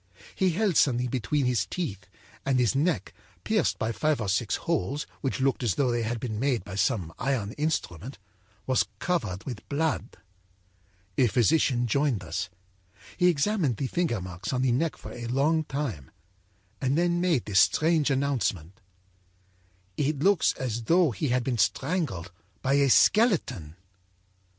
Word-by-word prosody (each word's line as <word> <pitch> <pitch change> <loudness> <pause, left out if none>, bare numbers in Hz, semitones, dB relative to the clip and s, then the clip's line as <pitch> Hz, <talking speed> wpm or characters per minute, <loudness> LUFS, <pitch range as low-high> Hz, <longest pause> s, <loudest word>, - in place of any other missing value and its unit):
He 190 - +2
held 200 -1 +1
something 125 -2 +3
between 130 +3 0
his 120 -7 +1
teeth, 100 - -4 0.4
and 135 -1 +1
his 125 -1 +2
neck, 145 - 0 0.3
pierced - - +1
by 110 - -1
five 150 +6 0
or 105 -4 -2
six 100 +1 +1
holes 150 -3 -2
which 135 - -2
looked 135 0 +1
as 115 -8 0
though 130 -3 +1
they 120 0 0
had 115 +1 -2
been 110 -3 -4
made 130 -5 0
by 100 - -8
some 100 -4 0
iron 125 -7 -1
instrument, 135 - -3 0.5
was 130 -1 +2
covered 110 - -2
with 120 -5 -8
blood. 155 +2 -1 1.0
âA 130 - +5
physician 125 +2 +2
joined 130 -4 0
us. 85 +2 -4 0.7
He 180 - +3
examined 165 - +1
the 135 - -2
finger 160 - -1
marks 90 0 -6
on 130 -1 0
the 130 - +3
neck 155 +7 0
for - - -10
a 120 -1 -6
long 150 +6 +1
time 130 - -4 0.7
and 135 +2 +1
then 175 0 +1
made 170 -9 +1
this 95 -3 +3
strange 155 - +3
announcement: 110 - -1 1.2
â'It 145 0 0
looks 200 -2 +4
as 120 -3 -4
though 170 +1 +4
he 145 +6 -2
had 125 0 +1
been 120 -2 -2
strangled 125 - -1 0.3
by 135 - +2
a 140 -1 +4
skeleton.' 130 - +3
130 Hz, 155 wpm, -27 LUFS, 110-150 Hz, 1.2 s, âA